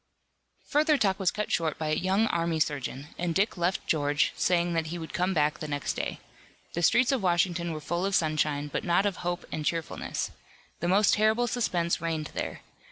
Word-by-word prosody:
Further 300 Hz, 0 st, +3 dB
talk 195 Hz, -5 st, +1 dB
was 190 Hz, -2 st, +3 dB
cut 210 Hz, +2 st, -3 dB
short 160 Hz, -2 st, 0 dB
by 155 Hz, -1 st, -2 dB
a -, -, +1 dB
young 190 Hz, +6 st, +2 dB
army 170 Hz, -5 st, 0 dB
surgeon, 145 Hz, -1 st, -2 dB
and 170 Hz, -1 st, -1 dB
Dick 200 Hz, +4 st, +2 dB
left 175 Hz, +1 st, -1 dB
George, 145 Hz, -1 st, +1 dB
saying 175 Hz, -1 st, +1 dB
that 165 Hz, -1 st, 0 dB
he 170 Hz, +2 st, -4 dB
would 160 Hz, -1 st, -7 dB
come 180 Hz, +2 st, +1 dB
back 150 Hz, -3 st, +1 dB
the 155 Hz, -, -4 dB
next 145 Hz, -1 st, -2 dB
day. -, -, -3 dB, 0.5 s
The 170 Hz, -, -2 dB
streets 240 Hz, -, +4 dB
of 265 Hz, -4 st, +1 dB
Washington 175 Hz, -1 st, +1 dB
were 155 Hz, -, -4 dB
full 170 Hz, +4 st, -2 dB
of 195 Hz, -, 0 dB
sunshine, 155 Hz, -2 st, +1 dB
but 145 Hz, -, -3 dB
not 175 Hz, +3 st, +2 dB
of 200 Hz, -3 st, 0 dB
hope 175 Hz, 0 st, -3 dB
and 155 Hz, -, -3 dB
cheerfulness. 165 Hz, 0 st, -2 dB, 0.5 s
The 175 Hz, -, -1 dB
most 200 Hz, +3 st, +4 dB
terrible 220 Hz, +3 st, +3 dB
suspense 180 Hz, -8 st, 0 dB
reigned 160 Hz, -2 st, -2 dB
there. -, -, -4 dB
170 Hz, 200 wpm, -28 LUFS, 155-195 Hz, 0.5 s, streets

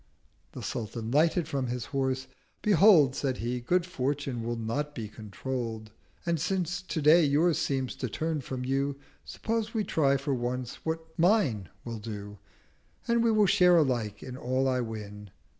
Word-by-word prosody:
The -, -, -7 dB
Sultan 110 Hz, 0 st, -4 dB
lighted 160 Hz, +3 st, +3 dB
from 140 Hz, -4 st, -2 dB
his 120 Hz, -1 st, -3 dB
horse. 130 Hz, -1 st, 0 dB, 0.4 s
'Behold,' 195 Hz, -10 st, +6 dB
Said 130 Hz, -3 st, -1 dB
he, 120 Hz, +2 st, -2 dB
'Good 175 Hz, +8 st, +1 dB
Fortune 140 Hz, -6 st, -2 dB
will 120 Hz, +1 st, -2 dB
not 130 Hz, +7 st, -3 dB
be 115 Hz, -3 st, -4 dB
controll'd: 110 Hz, +1 st, -5 dB, 0.3 s
And, 170 Hz, -3 st, 0 dB
since 185 Hz, +2 st, -1 dB
Today 160 Hz, -1 st, +4 dB
yours 155 Hz, +3 st, +3 dB
seems 135 Hz, -2 st, -1 dB
to 125 Hz, -, -3 dB
turn 155 Hz, +5 st, -2 dB
from 125 Hz, 0 st, -5 dB
you, 135 Hz, +1 st, 0 dB, 0.3 s
170 -, -, -6 dB
Suppose 225 Hz, 0 st, -2 dB
we 215 Hz, -, +1 dB
try 140 Hz, -7 st, +2 dB
for 140 Hz, +1 st, -2 dB
once 125 Hz, 0 st, -3 dB
what 160 Hz, 0 st, -2 dB
mine 165 Hz, -, +3 dB, 0.2 s
will 115 Hz, -2 st, -5 dB
do, 105 Hz, -2 st, -7 dB, 0.7 s
And 235 Hz, -1 st, +3 dB
we 230 Hz, -, +4 dB
will 215 Hz, -2 st, +4 dB
share 180 Hz, -1 st, +5 dB
alike 120 Hz, -9 st, 0 dB
in 125 Hz, -, -7 dB
all 130 Hz, +1 st, 0 dB
I 130 Hz, -1 st, +1 dB
win.' 105 Hz, -3 st, -7 dB
135 Hz, 165 wpm, -29 LUFS, 120-165 Hz, 0.7 s, Behold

